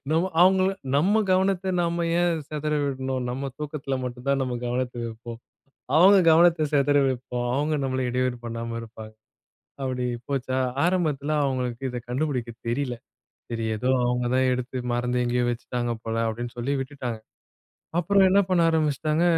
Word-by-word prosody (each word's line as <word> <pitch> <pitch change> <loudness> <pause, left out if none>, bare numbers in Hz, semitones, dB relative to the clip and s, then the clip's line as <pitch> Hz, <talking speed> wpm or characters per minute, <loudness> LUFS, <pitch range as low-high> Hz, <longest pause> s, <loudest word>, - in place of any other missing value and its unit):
நம்ம 170 +4 +1
அவுங்கள 190 +1 +5 0.3
நம்ம 200 +9 +3
கவனத்த 190 0 +1
நம்ம 170 0 0
ஏன் 170 -3 +1
செதற 150 0 -3
விடணும்? 130 -1 -2
நம்ம 135 +2 -4
தூக்கத்ல 145 -2 -4
மட்டும் 125 +1 -7
தான் 140 0 +2
நம்ம 125 -2 -2
கவனத்ல 125 0 -2
இருப்போம். 115 +1 -9 0.6
அவுங்க 195 +4 +7
கவனத்த 165 -1 +5
செதற 145 0 +4
வப்போம். 125 -1 -3
அவுங்க 150 +3 0
நம்மள 130 0 -1
இடையூறு 125 0 0
பண்ணாம 115 0 -4
இருப்பாங்க. 110 -1 -10 0.7
அப்படி 130 -1 -2 0.2
போச்சா, 130 -2 -1 0.3
ஆரம்பத்ல 155 -5 0
அவங்களுக்கு 125 -1 -2
இத 125 - -4
கண்டுபுடிக்க 125 -2 -2 0.2
தெரியல. 125 0 -1 0.5
சரி 115 -1 -3
ஏதோ, 125 +5 -1 0.2
அவுங்க 125 0 0
தான் 130 0 +3
எடுத்து 125 +1 -4 0.2
மறந்து 125 +1 0
எங்கயோ 120 0 +1
வச்சுட்டாங்க 120 0 -3
போல, 115 0 -3
அப்படின்னு 120 +2 -4
சொல்லி 130 +4 -1
விட்டுட்டாங்க. 130 -5 -5 0.8
அப்புறம் 195 +2 +4
என்ன 200 +1 +5
பண்ண 180 -2 +3
ஆரம்பிச்சிட்டாங்க. 155 +1 +1
130 Hz, 145 wpm, -25 LUFS, 125-155 Hz, 0.8 s, அவுங்க